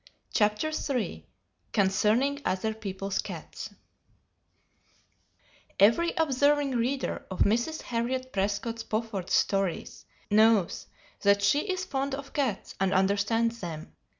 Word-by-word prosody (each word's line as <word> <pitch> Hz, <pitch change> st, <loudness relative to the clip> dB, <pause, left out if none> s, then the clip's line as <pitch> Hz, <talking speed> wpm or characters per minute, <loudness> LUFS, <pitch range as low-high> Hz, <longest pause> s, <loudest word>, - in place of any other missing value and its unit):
CHAPTER 210 Hz, +9 st, +2 dB
III 275 Hz, -6 st, -3 dB, 0.5 s
CONCERNING 215 Hz, +8 st, +2 dB
OTHER 205 Hz, +4 st, -1 dB
PEOPLE'S 195 Hz, -2 st, -4 dB
CATS -, -, -6 dB, 2.1 s
Every 230 Hz, -, +5 dB
observing 285 Hz, -2 st, +2 dB
reader 255 Hz, +3 st, -1 dB
of 190 Hz, -, -4 dB
Mrs. 235 Hz, +10 st, +1 dB
Harriet 255 Hz, +2 st, -2 dB
Prescott 205 Hz, +4 st, -1 dB
Spofford's 215 Hz, -4 st, -3 dB
stories 195 Hz, -3 st, 0 dB, 0.2 s
knows 215 Hz, -3 st, +3 dB, 0.3 s
that 200 Hz, 0 st, +4 dB
she 290 Hz, -, +2 dB
is 370 Hz, 0 st, -2 dB
fond 270 Hz, 0 st, -2 dB
of 275 Hz, 0 st, -9 dB
cats 260 Hz, -9 st, -1 dB
and 195 Hz, 0 st, +1 dB
understands 205 Hz, +4 st, +1 dB
them. 165 Hz, -5 st, -7 dB
225 Hz, 105 wpm, -28 LUFS, 200-270 Hz, 2.1 s, Every